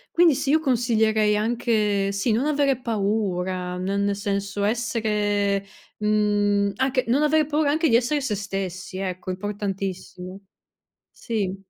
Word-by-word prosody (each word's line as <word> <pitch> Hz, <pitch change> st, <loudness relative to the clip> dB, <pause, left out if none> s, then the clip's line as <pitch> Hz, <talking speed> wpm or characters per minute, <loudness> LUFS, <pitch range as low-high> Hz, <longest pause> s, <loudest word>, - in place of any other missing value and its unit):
Quindi 335 Hz, -5 st, +5 dB
sì, 270 Hz, -, -1 dB
io 315 Hz, +2 st, +4 dB
consiglierei 220 Hz, -5 st, +2 dB
anche 210 Hz, -3 st, +1 dB
sì, 200 Hz, +4 st, -1 dB
non 230 Hz, +6 st, +1 dB
avere 280 Hz, -3 st, +1 dB
paura 190 Hz, -5 st, -1 dB
n -, -, -4 dB, 0.2 s
nel 200 Hz, 0 st, +1 dB
senso 200 Hz, 0 st, -3 dB
essere, 205 Hz, -3 st, 0 dB, 0.3 s
uhm, 205 Hz, -1 st, +2 dB
anche 260 Hz, +1 st, +1 dB
non 265 Hz, +5 st, +3 dB
avere 305 Hz, 0 st, +3 dB
paura 300 Hz, 0 st, +1 dB
anche 320 Hz, +2 st, +2 dB
di 230 Hz, -, +5 dB
essere 255 Hz, +5 st, +1 dB
se 245 Hz, -7 st, -2 dB
stessi 190 Hz, -1 st, -5 dB
ecco, 185 Hz, -1 st, -4 dB
è -, -, 0 dB
importantissimo, 195 Hz, -1 st, -5 dB, 0.7 s
sì. 205 Hz, -5 st, -3 dB
210 Hz, 140 wpm, -24 LUFS, 200-240 Hz, 0.7 s, Quindi